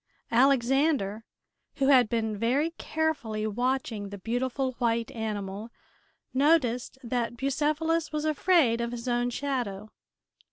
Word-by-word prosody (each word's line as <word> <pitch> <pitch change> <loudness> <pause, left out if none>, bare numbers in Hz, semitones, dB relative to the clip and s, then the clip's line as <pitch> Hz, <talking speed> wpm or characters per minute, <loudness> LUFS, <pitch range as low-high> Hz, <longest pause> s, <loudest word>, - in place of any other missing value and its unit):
Alexander, 260 -3 +2 0.5
who 275 -1 +2
had 250 -5 +6
been 220 -2 -1
very 255 +10 +1
carefully 280 -10 -1
watching 230 -2 -1
the 200 - -7
beautiful 255 +5 -1
white 230 -2 0
animal, 210 -1 -4 0.6
noticed 260 -4 +2
that 240 0 -2
Bucephalus 305 +5 0
was 305 0 -2
afraid 305 -6 +3
of 235 - -1
his 240 +1 -6
own 245 0 +1
shadow. 235 -6 -3
245 Hz, 115 wpm, -28 LUFS, 225-280 Hz, 0.6 s, had